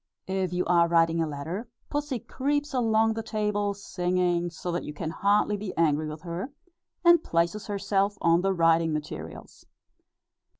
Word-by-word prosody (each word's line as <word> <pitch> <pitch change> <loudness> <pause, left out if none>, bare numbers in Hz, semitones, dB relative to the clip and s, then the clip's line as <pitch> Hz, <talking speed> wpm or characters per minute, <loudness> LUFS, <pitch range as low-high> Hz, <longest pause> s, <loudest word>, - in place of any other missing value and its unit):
If 190 -1 -1
you 180 0 -1
are 170 -1 +4
writing 165 0 +3
a 160 - 0
letter, 160 - -5 0.2
Pussy 290 -3 -1
creeps 290 +5 -2
along 225 -3 +2
the 225 - -3
table, 210 -2 -1
singing 180 -2 0
so 175 +1 -5
that 175 - -2
you 150 - -7
can 160 +1 -4
hardly 205 +3 +2
be 200 -1 -6
angry 155 -2 +2
with 155 0 -7
her, 180 +9 -5 0.5
and 345 -1 +7
places 170 +6 0
herself 200 0 0
on 170 +1 +3
the 195 +1 +1
writing 165 -2 +3
materials. 150 -1 -7
185 Hz, 160 wpm, -27 LUFS, 165-210 Hz, 0.5 s, and